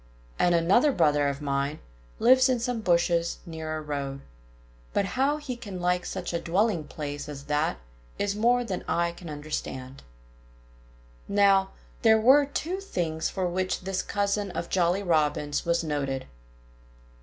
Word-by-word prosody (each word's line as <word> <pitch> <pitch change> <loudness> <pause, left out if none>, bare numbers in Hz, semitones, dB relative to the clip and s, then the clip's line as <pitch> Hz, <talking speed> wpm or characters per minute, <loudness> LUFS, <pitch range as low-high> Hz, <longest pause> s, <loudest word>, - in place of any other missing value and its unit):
And 175 -1 +4
another 195 - +4
brother 150 - +3
of 140 +1 -3
mine 140 +1 -1 0.4
lives 255 +3 +5
in 250 -2 +2
some 240 -1 -2
bushes 170 -2 +2
near 160 -2 -5
a - - -5
road. 140 -2 -4 0.7
But 200 - +2
how 275 +3 +2
he 295 -4 -5
can 205 -6 -7
like 180 0 0
such - - -4
a 170 - -1
dwelling 180 -1 +1
place 145 -1 -6
as 140 -2 -7
that 150 +2 0 0.4
is 200 0 -1
more 240 +3 +3
than 195 -6 -4
I 170 0 +1
can 170 -1 -10
understand." 140 -3 -5 1.3
Now, 195 -1 +4 0.3
there 220 -1 +5
were 270 +5 +6
two 340 +6 -3
things 170 - -2
for 190 -2 -2
which 185 +1 -1
this 190 0 -2
cousin 200 0 -1
of 170 -1 -5
Jolly 180 +2 +1
Robin's 150 -3 0
was 170 0 +2
noted. 140 -4 -2
175 Hz, 150 wpm, -27 LUFS, 150-210 Hz, 1.3 s, were